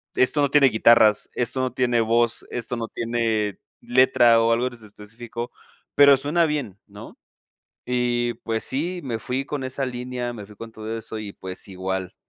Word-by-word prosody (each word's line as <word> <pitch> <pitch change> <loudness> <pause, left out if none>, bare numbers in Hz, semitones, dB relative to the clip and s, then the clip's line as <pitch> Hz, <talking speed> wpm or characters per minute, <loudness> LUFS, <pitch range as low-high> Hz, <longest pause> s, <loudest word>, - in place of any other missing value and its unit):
"Esto 135 +3 +2
no 140 - +2
tiene 145 -2 +6
guitarras, 110 -2 +4
esto 125 +2 -1
no 130 0 -1
tiene 125 -2 +1
voz, 115 +1 +1
esto 125 0 -4
no 115 -1 -5
tiene 115 -3 -1 0.2
letra 120 -2 +4
o 115 0 +2
algo 120 +2 +1
en 130 - -6
ese 115 -3 -13
específico, 115 +3 -8 0.4
pero 140 -1 +7
suena 150 +5 +1
bien", 140 - -3
¿no? 100 0 -12 0.7
Y 120 -1 0
pues 110 -1 -2
sí, 175 +7 -2
me 120 -5 -4
fui 130 +4 -3
con 145 -2 -4
esa 130 +1 -3
línea, 125 -1 -4
me 105 -3 -9
fui 105 - -15
con 115 +2 -10
todo 110 +1 -6
eso 110 0 -6
y 105 -2 -7
pues 95 0 -6
igual, 95 -1 -4
120 Hz, 180 wpm, -23 LUFS, 110-130 Hz, 0.7 s, pero